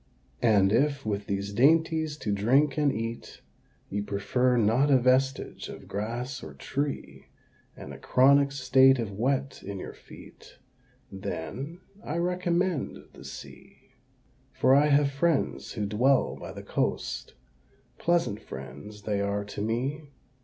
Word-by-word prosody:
And 100 -4 +4
if, 140 +4 +1
with 100 -1 -2
these 100 0 -3
dainties 160 +4 +3
to 105 - -1
drink 130 +8 +3
and 150 -2 +2
eat, 115 0 -5 0.5
You 100 +1 -3
prefer 120 +5 +1
not 120 +6 +3
a 135 - +6
vestige 130 +2 +1
of - - -10
grass 120 +6 -4
or - - -9
tree, 140 0 -4 0.5
And - - -9
a - - -10
chronic 140 +2 +4
state 130 0 +5
of 115 -4 -3
wet 130 +6 -1
in 100 0 -6
your - - -7
feet, - - -15 0.5
Then 95 - -6 0.2
I 155 - -3
recommend 175 -2 -1
the - - -13
Sea. - - -12 0.6
For 130 - +3
I 145 +2 +5
have 140 -1 +3
friends 150 +2 0
who 105 -3 -2
dwell 125 +7 +2
by - - -8
the - - -9
coast - - -2 0.6
Pleasant 165 -12 +1
friends 105 0 -9
they 105 -2 -1
are 100 0 -1
to 100 - -6
me! 135 +8 -2
130 Hz, 140 wpm, -28 LUFS, 105-145 Hz, 0.6 s, a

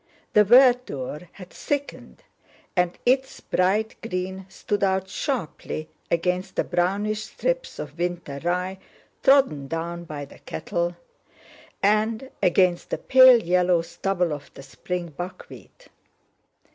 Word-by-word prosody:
The 210 - +7
verdure 230 - +3
had 185 -2 -12
thickened 285 - -5 0.5
and 180 -1 +1
its 265 +2 +1
bright 205 +4 0
green 190 -2 -4
stood 205 +1 -3
out 190 -1 +1
sharply 185 - -4 0.2
against 180 +2 -1
the - - +1
brownish 205 +4 -1
strips - - -3
of 150 +2 -8
winter 175 -5 -3
rye 180 +2 -1 0.4
trodden 265 - +4
down 170 +3 -4
by 150 -3 -6
the - - -16
cattle, 175 -2 -3 0.9
and 220 +5 +1
against 180 0 +2
the - - -1
pale 255 -2 +7
yellow 180 -1 +2
stubble 175 0 -1
of 145 -1 -8
the 135 - -10
spring 180 +4 -5
buckwheat. 175 - -10
185 Hz, 120 wpm, -24 LUFS, 170-215 Hz, 0.9 s, The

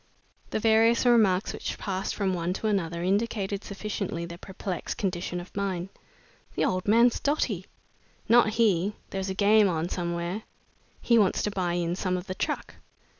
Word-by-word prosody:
The - - -1
various 225 +2 +4
remarks 215 -6 +4
which - - -4
passed 195 -1 -3
from 195 -3 0
one 175 0 -1
to 195 - -6
another 170 -5 0
indicated 200 0 -1
sufficiently 195 -4 -4
their 170 0 -9
perplexed 190 -1 -5
condition 180 -2 -2
of 175 - -11
mind. 190 -2 -2 0.7
"The - - +1
old 185 +1 -1
man's 230 +3 +5
dotty!" 235 - -1 0.6
"Not 235 -1 +6
he! 205 -3 +2 0.2
There's 190 0 -3
a 190 - -3
game 205 +1 +5
on 165 0 -1
somewhere!" 170 +3 -3 0.6
"He 235 -1 +4
wants 200 -3 +2
to 210 - 0
buy 180 -3 -1
in 175 0 -1
some 185 -1 -1
of 180 - -6
the 185 - -4
truck!" - - -3
195 Hz, 165 wpm, -27 LUFS, 180-215 Hz, 0.7 s, Not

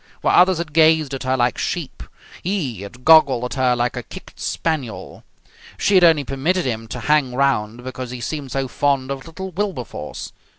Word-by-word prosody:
Where - - +2
others 180 0 +5
had 165 -3 -5
gazed 160 -2 +4
at 135 - -4
her 130 0 0
like 120 -2 +1
sheep - - -4 0.4
he 155 - -2
had 120 +5 -11
goggled 150 -6 +6
at 125 - -3
her 130 -2 +2
like 120 +1 -1
a 125 - -3
kicked - - -12
spaniel. 150 -9 -3 0.5
She 200 - +1
had 185 -2 +6
only 160 -4 +5
permitted 155 +8 -1
him 115 -3 -3
to 120 +2 -6
hang 145 -2 +2
round 120 -4 0
because 130 -1 -6
he 125 0 -6
seemed 140 +1 -5
so 135 +1 -1
fond 135 0 0
of 135 +1 -6
little 190 +3 -7
Wilberforce. 175 - -5
135 Hz, 185 wpm, -20 LUFS, 125-160 Hz, 0.5 s, goggled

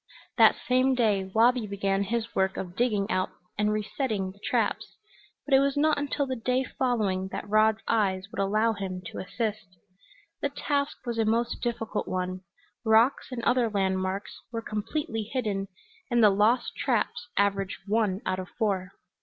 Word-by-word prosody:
That - - +7
same 255 +1 +3
day 210 -6 +2
Wabi 225 +4 +3
began 195 -1 0
his 230 +2 -2
work 190 0 +1
of 180 -1 -5
digging 215 -4 +1
out 185 0 +1 0.3
and 210 0 +1
resetting 215 -2 -2
the 200 - -20
traps, - - -1 0.5
but 285 - -1
it 270 - +8
was 280 +1 +1
not 305 0 +3
until 285 0 -1
the 260 -1 -3
day 250 +2 0
following 215 -9 0
that - - -6
Rod's 215 +1 +3
eyes 190 -4 +1
would - - -6
allow 215 +3 +2
him 190 -3 -5
to - - -6
assist. 215 +1 -3 0.7
The 285 - +1
task 280 -1 -2
was 235 -1 -2
a 225 - +3
most 230 +2 0
difficult 225 -3 -2
one; 185 0 -2 0.4
rocks 225 +4 +4
and 240 -2 -4
other 245 -2 +3
landmarks 190 -1 -1 0.2
were 230 -1 -4
completely 225 +3 -3
hidden, 205 -6 -1 0.4
and 240 -2 +3
the 210 - +7
lost 215 +5 +2
traps - - -1
averaged 195 -1 +1
one 210 -2 +1
out 185 0 -1
of 185 - -6
four. 195 -4 -1
215 Hz, 165 wpm, -27 LUFS, 195-240 Hz, 0.7 s, it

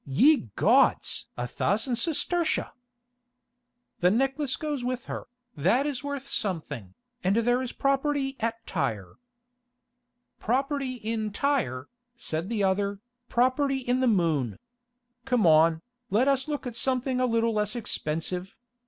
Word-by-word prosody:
Ye 230 - +4
gods! - - +3
a 120 - -2
thousand 220 - 0
sestertia!" 335 +5 0 1.3
"The 180 - +4
necklace 270 +5 +1
goes 295 -5 -3
with 250 0 -3
her, - - -6 0.3
that 190 - +2
is 290 -2 -3
worth 285 -1 -4
something, 145 - -4 0.3
and 190 +2 +2
there 245 +2 +2
is 255 - -4
property 275 0 0
at 230 0 -3
Tyre." 100 -4 -3 1.2
"Property 270 +2 -1
in 220 -2 -3
Tyre," 200 - 0 0.3
said 165 -4 -3
the 220 -3 0
other, 200 +1 +1 0.3
"property 260 +3 +2
in 250 -1 0
the 260 - +2
moon. 160 - +1 0.7
Come 250 -6 +2
on, 160 0 +5 0.3
let 220 +7 +3
us 275 0 +2
look 295 -2 -3
at 245 -2 -5
something 255 +1 0
a 255 - +3
little 230 -1 +1
less 210 0 -1
expensive. 180 -3 -3
235 Hz, 130 wpm, -27 LUFS, 190-270 Hz, 1.3 s, on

